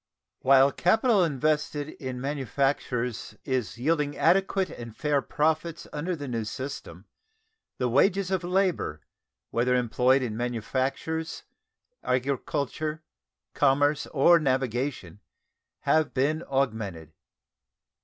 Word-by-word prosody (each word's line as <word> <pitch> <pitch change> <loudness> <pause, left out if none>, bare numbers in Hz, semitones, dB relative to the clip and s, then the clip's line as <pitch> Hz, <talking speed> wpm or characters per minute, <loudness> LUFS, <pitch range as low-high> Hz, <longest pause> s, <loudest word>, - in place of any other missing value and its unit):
While 135 +1 +5
capital 215 - +3
invested 150 -1 0
in 130 -5 -6
manufactures 135 -3 -2
is 130 -5 -2
yielding 145 +2 0
adequate 190 0 +2
and 115 -2 -9
fair 150 -2 +1
profits 160 +3 -1
under 170 +5 -2
the 145 -3 -6
new 115 -3 -2
system, 130 +6 -7 0.7
the 125 - 0
wages 190 - +2
of 185 -2 0
labor, 180 - 0 0.5
whether 125 +2 +2
employed 125 +2 +3
in 110 -4 -3
manufactures, 130 +7 -2 0.6
agriculture, 140 +4 -2 0.5
commerce, 145 +2 +2
or 170 +4 +5
navigation, 130 - -1 0.6
have 155 -2 +2
been 150 +5 +1
augmented. 110 - -2
140 Hz, 100 wpm, -27 LUFS, 125-155 Hz, 0.7 s, While